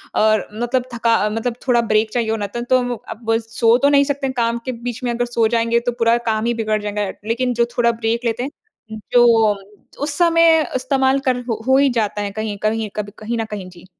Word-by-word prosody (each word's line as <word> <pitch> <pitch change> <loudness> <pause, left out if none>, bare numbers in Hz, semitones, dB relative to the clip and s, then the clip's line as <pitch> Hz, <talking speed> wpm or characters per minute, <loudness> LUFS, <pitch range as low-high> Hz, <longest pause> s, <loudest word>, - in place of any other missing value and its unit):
अ, 215 0 +4 0.2
मतलब 240 +3 -1
थका 230 -2 +2
मतलब 225 +2 -2
थोड़ा 240 -2 +4
ब्रेक 215 -1 +1
चाहिए 235 -2 0
होना 220 -2 -1
था, 235 +4 -5
तो 245 0 +1
अब 225 0 -6 0.2
सो 230 0 +3
तो 280 +3 +3
नहीं 280 -1 +5
सकते 280 -1 -2
हैं। 260 - -3
काम 235 0 +1
के 260 - -2
बीच 240 0 -6
में 245 - 0
अगर 240 +1 -1
सो 235 -2 +1
जाएँगे, 230 0 +1
तो 245 +1 -2
पूरा 230 +1 +4
काम 215 +1 -1
ही 240 - +1
बिगड़ 215 -2 -1
जाएगा, 210 0 -2 0.2
लेकिन 245 +2 0
जो 235 0 +2
थोड़ा 235 -1 +4
ब्रेक 230 +1 -2
लेते 235 +1 -1
हैं, 265 - -11
जो 240 -1 +6 0.8
उस 290 0 -3
समय 330 -2 +5
इस्तेमाल 265 +1 +1
कर 255 -1 +2
हो 225 - -2
हो 265 0 +5
ही 280 0 +4
जाता 215 -4 -1
है 200 -1 -3
कहीं 215 0 -4
कहीं 215 0 0
कभी 205 -1 -4
कहीं 230 +2 -3
न 225 - -1
कहीं। 195 -3 -6
जी। 175 0 -16
235 Hz, 225 wpm, -19 LUFS, 220-250 Hz, 0.8 s, जो